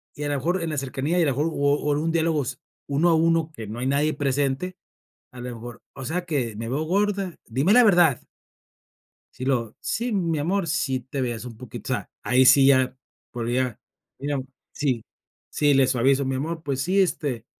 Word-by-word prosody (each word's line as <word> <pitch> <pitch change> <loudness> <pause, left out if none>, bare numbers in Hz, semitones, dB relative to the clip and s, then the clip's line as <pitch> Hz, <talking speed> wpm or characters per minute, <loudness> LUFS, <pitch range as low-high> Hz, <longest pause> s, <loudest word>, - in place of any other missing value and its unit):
y 150 - -5
a 145 - -1
lo 145 - 0
mejor 175 +7 0
en 165 - -2
la 150 - -3
cercanía, 140 +5 -1
y - - +4
a - - +3
lo 140 - +2
mejor, 145 +5 0
o 145 -3 +1
o 150 0 -1
en 145 - 0
un 165 +1 0
diálogo 160 -3 +1
s 130 0 -4 0.3
1 145 +5 +2
a 165 - +5
1 165 0 +2
que 110 -7 -8
no 110 +3 -6
hay 125 - -1
nadie 145 +3 +2
presente, 145 +5 -1 0.6
a 125 - -10
lo 125 0 -5
mejor: 115 0 -10
"O 135 - -7
sea 175 +5 -2
que, 130 -9 -1
¿Me 115 +1 -5
veo 135 +5 -1
gorda? 195 +1 0
¡Dime 135 - +2
la 245 +2 +7
verdad!" 175 - +4 1.1
Si 130 - -6
luego: 120 -5 0
"Sí, 240 +2 -2
mi 170 -6 0
amor, 175 +4 0
sí 135 -5 0
te 135 +2 -5
veías 120 -2 -3
un 120 - -8
poquito", 125 -1 -5
o - - +3
sea, - - -7
ahí 130 +1 +4
sí 135 +1 +7
ya 130 -1 +4 0.4
podría, 120 0 -1 0.4
mira 140 0 -2 0.3
si 130 -6 -1 0.5
si 145 -1 +2
le 135 -1 +4
suavizo: 130 +2 +2
"Mi 135 0 -1
amor, 160 +4 -3
pues 135 -2 -2
sí, 185 +6 +1
este, 140 - -1
140 Hz, 215 wpm, -24 LUFS, 130-165 Hz, 1.1 s, la